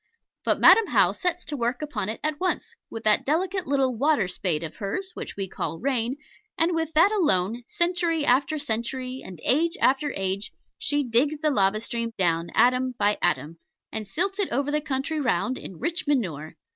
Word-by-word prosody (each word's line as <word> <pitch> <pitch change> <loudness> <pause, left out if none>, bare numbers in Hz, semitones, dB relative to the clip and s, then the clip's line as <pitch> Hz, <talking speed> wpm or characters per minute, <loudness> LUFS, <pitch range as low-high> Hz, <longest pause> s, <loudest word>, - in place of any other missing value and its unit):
But - - +1
Madam 455 - +7
How - - +4
sets 360 -1 -2
to 295 - -2
work 245 +2 -2
upon 220 -10 -3
it 220 - -4
at 305 -1 -1
once, 370 0 -2 0.2
with 225 - -7
that 215 -1 +4
delicate 365 +5 -1
little 270 -2 +1
water 275 -4 +2
spade 180 -3 -2
of 160 - -7
hers, 370 - -3
which - - -7
we 195 -1 -2
call 165 - -4
rain, 255 +2 -1 0.4
and 335 +2 +2
with 325 -1 -2
that 335 +6 +5
alone, 235 - +1
century 345 -3 0
after 280 +5 +2
century, 255 0 -3
and 180 -4 -10
age 330 +6 +2
after 275 +2 +2
age, 195 +1 -2 0.3
she 290 0 0
digs 270 +5 +1
the 305 -1 +2
lava 200 -4 +2
stream 230 0 -3
down, 170 -2 +1
atom 255 0 +3
by 205 0 +1
atom, 160 -1 0 0.3
and 215 -2 -5
silts 385 - 0
it 400 - +1
over 280 +3 -1
the 300 0 +1
country 285 +2 -2
round 255 -1 0
in 185 - -9
rich 340 - -3
manure. 170 - -1
260 Hz, 185 wpm, -25 LUFS, 210-310 Hz, 0.4 s, Madam